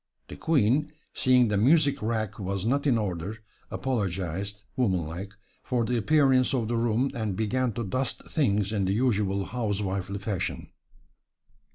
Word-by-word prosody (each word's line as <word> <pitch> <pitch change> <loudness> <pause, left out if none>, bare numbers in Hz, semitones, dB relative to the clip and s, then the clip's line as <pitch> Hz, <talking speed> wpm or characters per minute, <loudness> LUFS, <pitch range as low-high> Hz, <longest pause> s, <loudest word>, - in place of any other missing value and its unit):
The - - -7
Queen, 145 -1 +2 0.2
seeing 125 -3 +4
the 105 - +1
music 145 +6 +4
rack 110 -2 -2
was 100 0 -3
not 140 +5 +1
in 125 -4 +4
order, 100 0 -3 0.3
apologized, 100 -4 -3
womanlike, 95 -4 -1 0.3
for 120 -2 0
the 125 - 0
appearance 130 +1 +3
of 115 -4 0
the 120 - -1
room 115 +3 +1
and 110 -4 -2
began 120 +4 0
to 120 - -3
dust 125 +6 -2
things 105 - +1
in 100 -3 +1
the 95 - +1
usual 100 -4 +1
housewifely 100 -4 -2
fashion. 95 -2 -3
110 Hz, 145 wpm, -27 LUFS, 100-125 Hz, 0.3 s, seeing